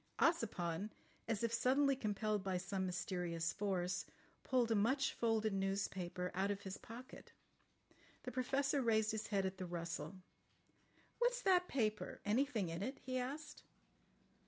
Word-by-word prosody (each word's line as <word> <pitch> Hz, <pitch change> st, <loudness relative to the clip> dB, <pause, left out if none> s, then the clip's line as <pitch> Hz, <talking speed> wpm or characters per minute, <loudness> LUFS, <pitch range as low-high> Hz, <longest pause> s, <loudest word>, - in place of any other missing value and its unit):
Ossipon, 205 Hz, -, +1 dB, 0.4 s
as 225 Hz, -1 st, 0 dB
if 230 Hz, 0 st, +1 dB
suddenly 270 Hz, +4 st, +4 dB
compelled 215 Hz, -3 st, 0 dB
by 190 Hz, -2 st, 0 dB
some 190 Hz, +1 st, -1 dB
mysterious 175 Hz, -2 st, -1 dB
force, 185 Hz, -3 st, -1 dB, 0.4 s
pulled 245 Hz, -3 st, +2 dB
a -, -, +5 dB
much 265 Hz, +7 st, +3 dB
folded 220 Hz, -2 st, +1 dB
newspaper 190 Hz, -2 st, -1 dB
out 190 Hz, +2 st, +1 dB
of 200 Hz, 0 st, -1 dB
his 190 Hz, -1 st, -5 dB
pocket. 245 Hz, +3 st, -10 dB, 0.9 s
The 250 Hz, -, -4 dB
Professor 275 Hz, +2 st, +1 dB
raised 220 Hz, -3 st, +3 dB
his 220 Hz, 0 st, -2 dB
head 200 Hz, -2 st, +1 dB
at 190 Hz, 0 st, -3 dB
the 185 Hz, -, -3 dB
rustle. 170 Hz, +2 st, -4 dB, 1.0 s
"What's -, -, +2 dB
that 360 Hz, -2 st, +5 dB
paper? 215 Hz, -5 st, 0 dB
Anything 220 Hz, -3 st, +2 dB
in 165 Hz, +2 st, -3 dB
it?" 260 Hz, +7 st, -2 dB
he 255 Hz, 0 st, -1 dB
asked. 295 Hz, +4 st, -5 dB
215 Hz, 140 wpm, -39 LUFS, 190-255 Hz, 1.0 s, a